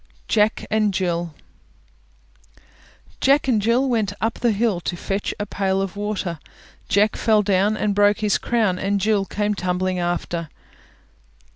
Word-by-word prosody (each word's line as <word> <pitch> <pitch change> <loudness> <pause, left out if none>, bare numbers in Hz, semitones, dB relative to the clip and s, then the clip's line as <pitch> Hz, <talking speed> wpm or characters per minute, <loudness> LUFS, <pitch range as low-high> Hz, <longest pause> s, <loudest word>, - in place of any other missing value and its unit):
JACK 215 0 +1
AND 215 -2 +1
JILL 170 -4 -2 1.8
Jack 275 +1 +3
and 230 -5 +2
Jill 235 +5 +2
went 220 -5 0
up 225 +1 -2
the 240 - +2
hill 210 -3 0
To 175 - -3
fetch 195 +3 -2
a 205 - -2
pail 195 -1 -1
of 195 0 -3
water; 205 -5 -3 0.5
Jack 210 0 +3
fell 215 -2 +2
down 200 +2 +2
and 210 -1 0
broke 205 +2 +3
his 210 -1 +2
crown, 215 -6 0
And 200 +1 0
Jill 205 0 +1
came 210 +1 -1
tumbling 185 -1 -1
after. 175 -2 -2
205 Hz, 145 wpm, -22 LUFS, 185-215 Hz, 1.8 s, Jack